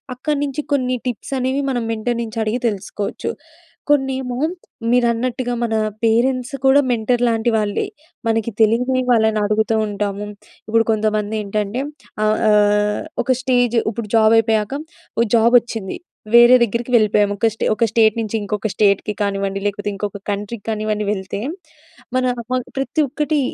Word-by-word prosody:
అక్కడి 295 +4 -1
నించి 285 +1 -3
కొన్ని 255 -2 +1
టిప్సనేవి 260 +3 -2
మన 250 - -1
మెంటర్ 230 +2 -2
నించి 225 0 -5
అడిగి 235 +3 -1
తెలుసుకోవచ్చు. 205 -1 -3 0.6
కొన్నేమో 265 -3 +1 0.5
మీరన్నట్టుగా 245 +1 +1
మన 235 -2 -1 0.3
పేరెంట్స్ 250 +4 +1
కూడా 265 +1 +6
మెంటర్‌లాంటి 235 0 +1
వాళ్ళే. 210 -1 -1 0.4
మనకి 225 0 0
తెలీని 245 +4 +3
వాళ్ళని 220 -2 +3
అడుగుతూ 215 +1 +1
ఉంటాము. 205 0 -3 0.4
ఇప్పుడు 225 +1 +3
కొంతమందేంటంటే, 215 +1 -1 0.4
ఆహ్, 215 0 +2
ఆహ్, 210 0 +3 0.2
ఒక 255 - 0
స్టేజ్ 245 -2 +2
ఉప్పుడు 225 -2 -6
జాబయిపోయాక, 220 +1 +3 0.5
ఓ - - +5
జాబొచ్చింది. 230 - +2 0.4
వేరే 240 +1 +9
దగ్గరికి 235 +2 -2
వెళ్ళిపోయాము. 210 -2 +3
ఒక 225 - +2
స్టే 225 - -3
ఒక 230 - +2
స్టేట్ 220 -1 +4
నించి 225 -1 -3
ఇంకొక 210 +1 -2
స్టేట్‌కి 205 0 +2
కానివ్వండి, 195 -1 -1
లేకపోతే 205 0 -3
ఇంకొక 205 0 -4
కంట్రీ‌కి 205 +2 -5
కానివ్వండి 215 -1 -1
వెళ్తే, 190 -1 -4 0.8
మన 255 - +1 0.2
అమోళ్ 250 +2 -3
ప్రతి 270 +3 0
ఒక్కటి 300 +1 0
225 Hz, 130 wpm, -19 LUFS, 210-245 Hz, 0.8 s, వేరే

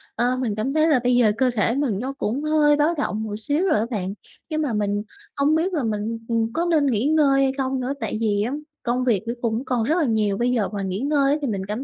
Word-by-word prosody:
Ờ, 245 +2 +1
mình 240 -5 -1
cảm 245 +6 -1
thấy 310 +1 +3
là 280 -5 +4
bây 250 0 +3
giờ 235 -4 +4
cơ 260 0 +3
thể 225 +3 +1
mình 250 -9 0
nó 265 +3 -3
cũng 270 +1 -3
hơi 305 -1 +4
báo 300 +3 +2
động 220 -6 -2
một 210 -1 -4
xíu 290 - 0
rồi 360 - +3
đó 220 - 0
bạn, 195 -3 -2 0.4
nhưng 310 0 -1
mà 280 -6 -1
mình 205 -1 -1 0.3
hông 285 +3 +3
biết 360 +4 0
là 300 -7 0
mình, 220 +1 -2
ừm, 230 -1 0
có 335 +5 0
nên 305 -4 +3
nghỉ 240 -2 +1
ngơi 290 -3 +3
hay 265 - +2
không 265 -1 -1
nữa, 255 +2 -2
tại - - -3
vì 205 -2 +1
á 240 +5 -2 0.3
công 245 +2 0
việc 220 -6 +1
nó 235 - -1
cũng 230 +2 -1
còn 245 -3 0
rất 315 +8 +1
là 320 - +2
nhiều. 215 -4 +1
Bây 240 +2 +1
giờ 230 -5 0
mà 205 -2 -4
nghỉ 190 +1 -3
ngơi 280 0 +2
á 300 - -1
thì 280 - -1
mình 195 -3 -2
cảm 215 +6 -3
250 Hz, 280 wpm, -23 LUFS, 220-285 Hz, 0.4 s, là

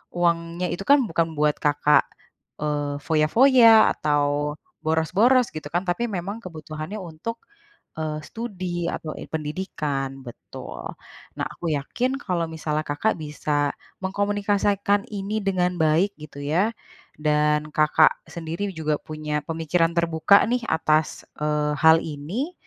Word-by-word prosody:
uangnya 170 0 0
itu 185 - -4
kan, 285 -1 +6
bukan 165 -3 -1
buat 150 0 +2
Kakak, 150 0 +3 0.6
eee, 145 -1 -1
foya-foya 225 - +6
atau, 145 0 0 0.3
boros-boros, 200 +11 +3
gitu 155 -2 -6
kan, 175 +4 -1
tapi 175 +7 0
memang 200 +2 -4
kebutuhannya 155 +2 -7
untuk, 180 +7 -6 0.6
eee, 155 -1 -2
studi 185 -6 -4
atau, 155 - -5
eee, - - -7
pendidikan, 150 -4 -3
betul. 120 -2 -9 0.5
Nah, - - -1
aku 165 -3 -3
yakin 245 - -1
kalau 175 -7 -1
misalnya 155 -1 -2
Kakak 170 +8 0
bisa 150 -1 -1 0.3
mengkomunikasikan 200 0 +1
ini 205 +1 -3
dengan 180 -2 +1
baik, 160 +6 +3
gitu 150 -2 -12
ya, 170 +9 +2 0.5
dan 150 0 +1
Kakak 155 0 +4
sendiri 170 +4 -4
juga 155 -2 -1
punya 150 -1 -4
pemikiran 165 0 0
terbuka 170 +3 +4
nih, 245 +1 0
atas, 155 -1 +1
eee, 150 0 0
hal 160 0 +7
ini. 165 - -4
160 Hz, 125 wpm, -24 LUFS, 150-195 Hz, 0.6 s, hal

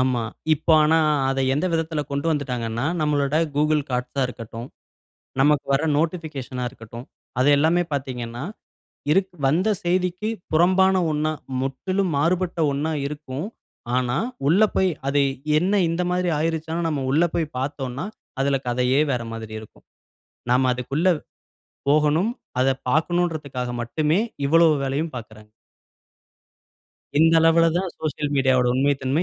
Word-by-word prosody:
ஆமா. 130 -2 +1 0.3
இப்ப 155 +3 -14
ஆனா 160 +2 +4 0.3
அத 135 0 -1 0.2
எந்த 150 +6 0
விதத்தில 160 -2 -1
கொண்டு 140 +2 -2
வந்துட்டாங்கன்னா, 125 -5 -2 0.2
நம்மளோட 150 -1 +1 0.2
Google 150 0 +3
கார்ட்ஸா 125 +2 -1
இருக்கட்டும், 115 0 -8 0.7
நமக்கு 145 +1 +3
வர 135 - +3 0.2
நோட்டிஃபிகேஷன்னா 155 -6 -3
இருக்கட்டும், 115 0 -11 0.3
அது 130 +3 +4
எல்லாமே 165 +4 +3
பார்த்தீங்கன்னா, 125 -2 -4 0.7
இருக் 190 +2 +2
வந்த 180 +10 +2
செய்திக்கு 180 +3 0 0.2
புறம்பான 185 +4 +4 0.2
ஒண்ணா, 155 +1 0 0.3
முற்றிலும் 185 +7 -1
மாறுபட்ட 175 +4 0
ஒண்ணா 145 +3 -1 0.2
இருக்கும். 150 +3 -5 0.5
ஆனா, 125 +1 0 0.3
உள்ள 185 +8 +4
போயி 190 - +3 0.2
அது 140 0 +2 0.4
என்ன 185 +5 +1 0.2
இந்த 165 +2 -1
மாதிரி 180 0 0
ஆயிருச்சானா 165 +1 -1
நம்ம 150 -3 -2
உள்ள 160 +4 +4
போய் 160 -3 -2
பார்த்தோன்னா, 135 +1 -4 0.4
அதில 135 0 +2
கதையே 125 +3 +2
வேற 120 -2 -1
மாதிரி 110 -1 -7
இருக்கும். 110 - -16 0.6
நாம 130 +1 +3
அதுக்குள்ள 140 +8 0 0.8
போகணும். 150 +8 +3 0.3
அத 130 - +3 0.2
பார்க்கணுன்றதுக்காக 155 -5 0
மட்டுமே 155 +8 0 0.3
இவ்ளோ 165 +3 +5 0.2
வேலையும் 145 +4 -2
பார்க்குறாங். 110 -2 -10 1.7
இந்த 165 0 +5
அளவுல 165 +1 +5
தான் 185 0 -2
சோசியல் 150 -1 -3
மீடியாவோட 130 -2 +3
உண்மைத்தன்மை 140 +3 +1
150 Hz, 125 wpm, -23 LUFS, 130-165 Hz, 1.7 s, இவ்ளோ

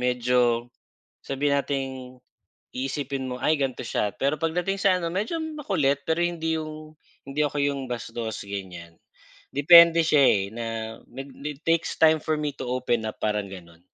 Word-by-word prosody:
Medyo, 125 -1 +1 0.5
sabihin 140 +1 -1
nating 135 -1 -1 0.9
iisipin 135 0 -3
mong, 125 0 -5
ay, 155 - +4
gan'to 130 -2 -2
siya, 105 - 0
pero 140 +3 +1
pagdating 180 +4 -1
sa 185 -2 +4
ano, 170 - -2
medyo 215 - -1
makulit. 195 - -1
Pero 160 +1 0
hindi 160 -2 -1
yung 155 0 -9 0.3
hindi 140 +2 -1
ako 145 0 -4
yung 140 -1 0
bastos 115 -1 -5
ganiyan. 90 -4 -8 0.5
Depende 170 +3 +7
siya, 155 -3 +4
eh, 100 -7 +4
na 115 0 -5 0.4
nag 135 +3 -8
need 150 +1 -7
takes 165 0 +1
time 160 -1 +5
for 155 0 -1
me 150 -1 -2
to 140 - -9
open 120 -3 -1
up, - - -7
parang 105 -2 -1
gano'n. 85 -3 -12
140 Hz, 160 wpm, -25 LUFS, 120-160 Hz, 0.9 s, Depende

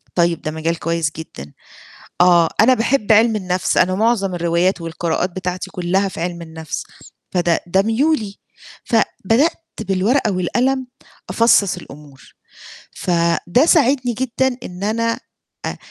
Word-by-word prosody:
طيب 170 -2 +1
ده 155 - -3
مجال 165 +1 -2
كويس 165 -2 -1
جدًا. 75 - -9 0.7
آه 175 -2 +5
أنا 255 +3 +6
باحب 225 -2 +1
عِلم 220 +1 +4
النفْس، 185 -2 -1
أنا 185 +1 +3
معظم 200 -3 +1
الروايات 175 +2 +1
والقراءات 165 +2 -2
بتاعتي 185 0 -5
كُلّها 190 +2 0
في 175 - -8
عِلم 170 0 -4
النفْس، 160 -1 -6 0.5
فده 175 -2 +2
ده 190 +3 +2
ميولي، 225 -2 0 0.5
فبدأت 230 - +1 0.3
بالورقة 205 +4 +1
والقلم 250 +9 0 0.4
أفصَّص 215 -5 +3
الأمور، 145 -4 -14 0.6
فده 175 - +1
ساعدني 260 -6 +3
جدًا 260 +1 -1
إن 180 -1 -7
أنا 230 +2 -1 0.5
أ - - -3
185 Hz, 125 wpm, -19 LUFS, 170-230 Hz, 0.7 s, أنا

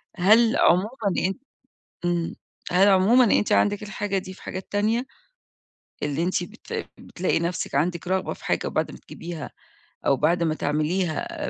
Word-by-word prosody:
هل 220 +5 +5
عمومًا 185 +4 +4 0.3
أن 190 +1 +1 0.7
امم، 175 -1 -1 0.4
هل 190 +3 +5
عمومًا 205 +6 +5
أنتِ 210 -2 +2
عندِك 205 +1 +2
الحاجة 205 -1 -2
دي 185 0 -5
في - - -16
حاجات 185 0 -7
تانية؟ 220 +5 +1 1.0
اللي 150 +3 -1
أنتِ 180 0 0
بت 220 +6 -7
بتلاقي 180 -2 -1
نفسِك 170 -4 -2
عندِك 170 +4 0
رغبة 190 0 0
في - - -14
حاجة - - 0
وبعد - - -1
ما - - -10
تجيبيها 165 -3 -7 0.5
أو 135 - +4
بعد 170 +3 +2
ما 155 -1 0
تعمليها 155 +3 -1
185 Hz, 150 wpm, -24 LUFS, 170-205 Hz, 1.0 s, هل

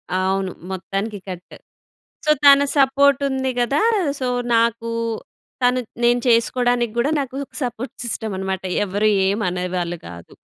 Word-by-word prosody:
అవును. 190 0 0 0.2
మొత్తానికి 195 +3 -4
cut. 180 -1 -8 0.7
So 305 - +4
తన 280 0 +8
సపోర్ట్ 280 0 +4
ఉంది 265 -1 -1
గదా! 245 +5 +1 0.4
సో 255 - -1 0.3
నాకు 230 0 +1 0.7
తను 250 +1 +3 0.2
నేను 240 +1 +4
చేసుకోవడానికి 240 0 +2
గూడా 255 +6 +2
నాకు 270 -2 -4 0.3
సపోర్ట్ 245 0 -4
సిస్టమ్ 220 -3 -3
అనమాట. 190 0 -3 0.2
ఎవరు 205 +2 +1 0.2
ఏమి 205 +3 0
అనేవాళ్ళు 180 -1 -3
గాదు. 85 0 -11
230 Hz, 125 wpm, -21 LUFS, 190-255 Hz, 0.7 s, తన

